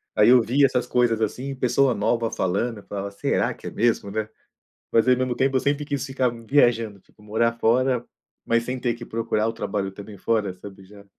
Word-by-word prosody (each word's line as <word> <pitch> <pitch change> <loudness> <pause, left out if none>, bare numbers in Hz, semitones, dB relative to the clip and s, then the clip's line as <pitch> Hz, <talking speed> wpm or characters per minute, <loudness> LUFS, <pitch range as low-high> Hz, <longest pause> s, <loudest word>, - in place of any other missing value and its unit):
Aí 105 +2 +5
eu 125 0 +7
via 130 +5 +3
essas 125 -2 0
coisas 120 -3 +1
assim, 130 +6 -2
pessoa 130 +1 +2
nova 115 +2 0
falando, 105 +5 -1
eu - - -15
falava: 100 0 -5
"Será 100 - 0
que - - -11
é - - -5
mesmo, 115 -3 0
né". 110 +1 -2 0.6
Mas 115 -1 +3
ao 125 0 +5
mesmo 125 -1 -1
tempo, 135 0 +1
eu - - +3
sempre 145 +2 0
quis 140 -3 -3
ficar 135 -2 0
viajando, 115 -3 +1
tipo, 105 - -25
morar 110 +2 +1
fora, 125 +1 +2 0.4
mas 115 0 +1
sem 125 +1 -4
ter 120 -1 0
que 120 0 -9
procurar 110 -1 -1
o - - -1
trabalho 100 -3 -3
também 100 +1 -10
fora, 105 -1 0
sabe, 95 +1 -12
já. 100 +1 -15
115 Hz, 210 wpm, -24 LUFS, 105-125 Hz, 0.6 s, eu